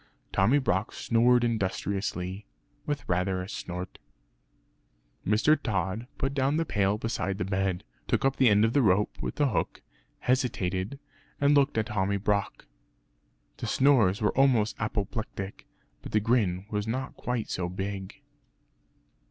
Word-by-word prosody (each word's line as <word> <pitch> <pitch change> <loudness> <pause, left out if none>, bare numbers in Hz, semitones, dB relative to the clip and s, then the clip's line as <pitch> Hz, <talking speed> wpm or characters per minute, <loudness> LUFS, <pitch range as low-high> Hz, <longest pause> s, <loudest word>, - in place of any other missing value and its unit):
Tommy 110 +9 +4
Brock 105 -7 0
snored 120 +1 +3
industriously, 100 -3 -2 0.4
with 145 -1 -3
rather 90 +1 0
a 90 - -5
snort. 90 -2 -6 1.2
Mr. 110 +9 +4
Tod 95 +3 -2
put 135 +1 -1
down 140 +2 +1
the 165 - +1
pail 100 -4 +1
beside 105 -4 -2
the 90 - -2
bed, 95 -2 -1 0.2
took - - +1
up 135 0 +2
the 130 -3 +5
end 105 +1 +5
of 115 - -1
rope 105 -7 +3
with - - -3
the 145 -2 +2
hook - - -2 0.4
hesitated, 110 -4 0 0.4
and 145 0 +4
looked 140 -3 +3
at 110 - +2
Tommy 100 -3 0
Brock. 100 -1 -1 0.9
The - - -4
snores 120 -9 +4
were 105 - +2
almost 125 -6 +3
apoplectic; 105 -2 -4 0.3
but - - -9
the 105 - +5
grin 100 -5 +1
was 105 0 -2
not 130 +4 -3
quite 125 -3 -3
so 90 -1 -2
big. 95 +1 -5
105 Hz, 140 wpm, -28 LUFS, 95-125 Hz, 1.2 s, the